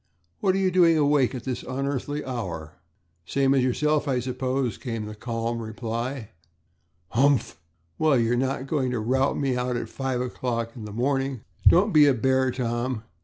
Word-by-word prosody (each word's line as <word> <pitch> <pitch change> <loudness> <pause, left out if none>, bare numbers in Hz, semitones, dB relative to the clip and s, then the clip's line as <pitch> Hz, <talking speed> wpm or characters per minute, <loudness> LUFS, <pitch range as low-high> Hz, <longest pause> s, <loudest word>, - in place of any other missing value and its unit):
What 190 -2 +2
are - - +1
you 190 -1 +2
doing 170 -3 +5
awake 145 -3 +3
at 125 - -6
this 130 -1 -3
unearthly 140 +2 -3
hour?" 90 - -5 0.5
"Same 135 +9 +2
as 135 -2 +3
yourself, 150 +4 +1
I 130 -2 +1
suppose," 130 -1 -2
came 115 -4 -4
the 105 - -7
calm 115 +1 -3
reply. 115 +2 -4 0.8
"Humph! 135 - +2 0.4
Well, 155 -4 +4
you're 115 0 +2
not 130 +1 -1
going 135 -3 0
to 125 -2 -1
rout 130 +5 +1
me 135 -3 0
out 125 0 -1
at - - -5
five 135 -2 -2
o'clock 120 -2 -3
in 115 -4 -8
the 105 - -7
morning." 135 +2 -1 0.3
"Don't 200 +4 +5
be 150 -2 +7
a 140 - +4
bear, 130 +2 +2
Tom. 120 -1 -2
130 Hz, 170 wpm, -25 LUFS, 115-140 Hz, 0.8 s, be